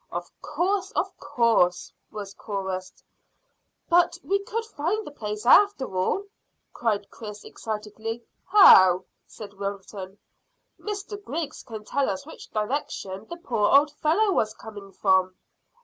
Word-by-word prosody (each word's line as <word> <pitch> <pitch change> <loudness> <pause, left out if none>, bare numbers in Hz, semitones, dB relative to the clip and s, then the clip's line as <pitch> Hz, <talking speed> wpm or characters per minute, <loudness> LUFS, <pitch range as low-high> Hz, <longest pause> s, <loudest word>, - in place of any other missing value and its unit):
"Of - - -5
course 370 +5 -1
of - - -1
course!" 200 -7 +2 0.2
was 205 -2 -7
chorused. 190 -3 -5 0.8
"But 345 0 +3
we 395 +1 +1
could 455 +2 -4
find 420 +2 -2
the - - -8
place, 210 -5 -5
after 275 - +5
all," 185 - 0 0.5
cried 210 -4 -1
Chris 210 -2 -9
excitedly. 220 +1 -6 0.2
"How?" 185 - +8 0.2
said 205 -2 -10
Wilton. 200 -1 -6 0.6
"Mr 410 0 -6
Griggs 310 -2 -4
can 220 -2 -9
tell 280 +4 0
us 280 - -4
which 320 - -12
direction 210 -4 -3
the 345 - -6
poor 225 -10 0
old 295 +1 +3
fellow 330 +8 +2
was 215 - 0
coming 205 -3 -10
from." 190 -1 +2
225 Hz, 130 wpm, -25 LUFS, -, 0.8 s, How